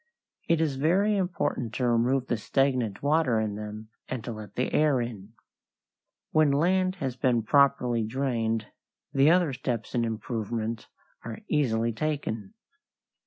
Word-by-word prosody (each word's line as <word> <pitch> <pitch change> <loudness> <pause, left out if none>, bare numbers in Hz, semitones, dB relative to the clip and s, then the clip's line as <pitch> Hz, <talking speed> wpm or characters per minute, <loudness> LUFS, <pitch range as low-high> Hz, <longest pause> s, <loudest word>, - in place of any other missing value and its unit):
It 165 -1 +4
is 150 -4 0
very 190 +9 +2
important 145 - -1
to 125 - 0
remove 120 +3 +2
the 120 - 0
stagnant 125 -2 0
water 145 -6 +2
in 110 -1 -1
them 105 +1 -7 0.2
and 130 -4 -4
to - - -5
let 105 -3 -9
the 125 - -1
air 150 -4 +3
in. 110 -3 -6 1.0
When 155 -1 +4
land 185 +5 +2
has 135 -8 -3
been 125 -3 +1
properly 125 -2 +3
drained 115 -2 -1 0.5
the 140 +1 +5
other 170 -4 +3
steps 125 -3 -3
in 120 -2 +1
improvement 115 0 -3 0.4
are 115 -1 -7
easily 115 -6 +1
taken. 145 - -3
125 Hz, 140 wpm, -27 LUFS, 115-145 Hz, 1.0 s, the